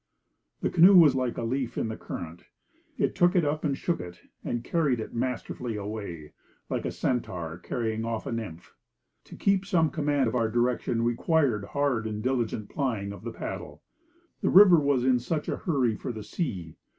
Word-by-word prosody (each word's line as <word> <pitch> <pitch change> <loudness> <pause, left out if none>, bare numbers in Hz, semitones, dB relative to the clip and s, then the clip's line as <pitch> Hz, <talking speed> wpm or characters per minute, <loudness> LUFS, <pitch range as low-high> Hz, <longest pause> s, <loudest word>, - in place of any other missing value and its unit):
The - - 0
canoe 180 +3 +7
was 160 -5 +7
like 130 -2 -1
a - - -2
leaf 125 +1 -2
in - - 0
the 110 - -4
current. 85 -4 -8 0.5
It - - +1
took 175 +2 +3
it 175 -4 +3
up 150 +1 -1
and 140 -3 0
shook 170 -1 -1
it, 90 0 -8 0.2
and 120 0 -3
carried 145 -5 +1
it 110 - -6
masterfully 125 -1 -3
away, 100 -7 -6 0.4
like - - -2
a - - -1
Centaur 85 -9 -3
carrying 110 +3 -3
off 115 -1 -3
a - - -4
nymph. 105 -8 -6 0.5
To - - -11
keep 195 -1 +2
some 170 -6 +2
command 145 -5 +1
on - - -4
our 115 -2 +1
direction 120 0 0
required 120 -2 +1
hard 125 0 0
and 105 -1 -4
diligent 120 -5 -1
plying 115 -9 -2
of 100 - -11
the 115 - -4
paddle. - - -7 0.6
The - - +1
river 185 -3 +8
was 140 -4 +1
in 130 -1 +4
such 150 +5 -3
a - - -2
hurry 130 - 0
for 125 - -5
the 110 -2 -7
sea! 100 - -4
120 Hz, 185 wpm, -27 LUFS, 110-145 Hz, 0.6 s, river